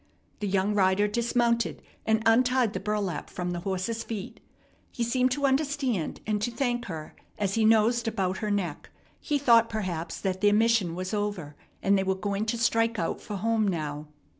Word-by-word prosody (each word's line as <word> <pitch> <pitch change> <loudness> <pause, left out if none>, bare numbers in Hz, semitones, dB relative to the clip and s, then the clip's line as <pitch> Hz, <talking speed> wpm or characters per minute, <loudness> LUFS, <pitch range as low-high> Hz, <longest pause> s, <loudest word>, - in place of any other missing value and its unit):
The 210 - -2
young 195 +1 +1
rider 195 0 +3
dismounted, 235 +1 +1 0.3
and 220 0 +2
untied 245 0 +3
the 185 - -2
burlap 200 -5 -2
from 180 0 -4
the 175 - -3
horse's 195 +5 -2
feet. 210 -4 -6 0.5
He 240 - -2
seemed 250 +2 +2
to 285 0 -1
understand, 270 - 0
and 210 -1 -1
to 220 - 0
thank 240 0 -1
her 160 -4 -7 0.2
as 200 -2 -1
he 225 0 +2
nosed 225 +2 +3
about 190 -4 -1
her 215 - -2
neck. 190 -7 -2 0.3
He 295 - 0
thought, 235 -4 +5
perhaps, 180 -7 -3
that 190 -1 -2
their 205 0 +5
mission 220 -6 +2
was 185 +3 -4
over 205 -8 -3 0.3
and 195 0 +4
they - - +1
were 190 0 0
going 200 +2 -2
to 235 - 0
strike 230 0 +2
out 165 - -2
for 210 - -6
home 220 +1 +1
now. 150 -4 -3
210 Hz, 185 wpm, -27 LUFS, 190-230 Hz, 0.5 s, thought